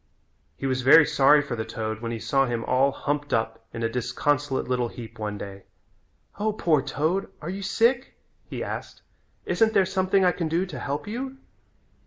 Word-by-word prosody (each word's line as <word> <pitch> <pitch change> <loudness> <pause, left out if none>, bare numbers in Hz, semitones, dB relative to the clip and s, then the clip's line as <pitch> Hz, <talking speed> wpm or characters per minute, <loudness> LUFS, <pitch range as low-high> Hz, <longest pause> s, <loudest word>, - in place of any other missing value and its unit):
He - - -5
was 130 -1 0
very 140 +5 +8
sorry 145 +2 +5
for 135 -4 -4
the 110 - -3
toad 110 0 -4
when 115 -1 -3
he 115 - -3
saw 135 +4 +1
him 120 -1 -2
all 130 +2 +3
humped 145 0 -2
up 115 0 -2
in 115 - -5
a - - +3
disconsolate 130 +4 -1
little 125 -1 0
heap 115 -1 -10
one 105 -1 -3
day. 100 -1 -8 0.7
"O, 215 +1 +1
poor 160 -8 +2
toad, 160 +8 -1
are 165 +3 -5
you 195 +1 -5
sick?" 230 +6 +1 0.3
he - - -4
asked. - - -6 0.4
"Isn't 220 -1 +2
there 190 - +4
something 190 +1 +2
I 180 - +5
can 170 -2 -2
do 170 +4 0
to 185 - -7
help 140 +1 -3
you?" 260 +5 -5
140 Hz, 190 wpm, -25 LUFS, 115-185 Hz, 0.7 s, very